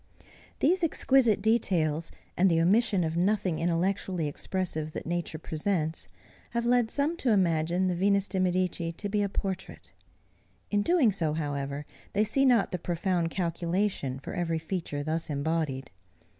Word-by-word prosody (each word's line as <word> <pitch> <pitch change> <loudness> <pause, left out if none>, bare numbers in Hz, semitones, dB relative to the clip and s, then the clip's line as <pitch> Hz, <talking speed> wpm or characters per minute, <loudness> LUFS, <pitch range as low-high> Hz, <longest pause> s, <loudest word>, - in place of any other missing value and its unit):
These 355 +5 +3
exquisite 260 -9 +3
details, 170 -8 +1 0.2
and 190 +2 +4
the 165 -1 +3
omission 195 +2 +3
of 160 0 -2
nothing 185 -2 +1
intellectually 175 0 0
expressive 155 -1 -3
that - - -5
nature 175 -1 -2
presents, 160 0 -2 0.5
have 235 - 0
led 240 -2 +3
some 290 +6 0
to 265 - 0
imagine 175 -3 +2
the 185 - +1
Venus 200 +2 +2
de 190 0 -2
Medici 180 -2 0
to 205 +5 -5
be 205 +1 +1
a 200 - 0
portrait. 190 -1 -5 0.8
In 205 -1 +2
doing 300 -3 +4
so, 165 -6 -1
however, 145 -2 -3 0.3
they 205 - +3
see 270 +6 +2
not 240 -6 +4
the 180 - -2
profound 175 0 -1
calculation 170 -4 -1
for 135 - -8
every 165 -2 -1
feature 160 -3 -4
thus 160 +2 -2
embodied. 145 -2 -2
180 Hz, 150 wpm, -28 LUFS, 160-205 Hz, 0.8 s, and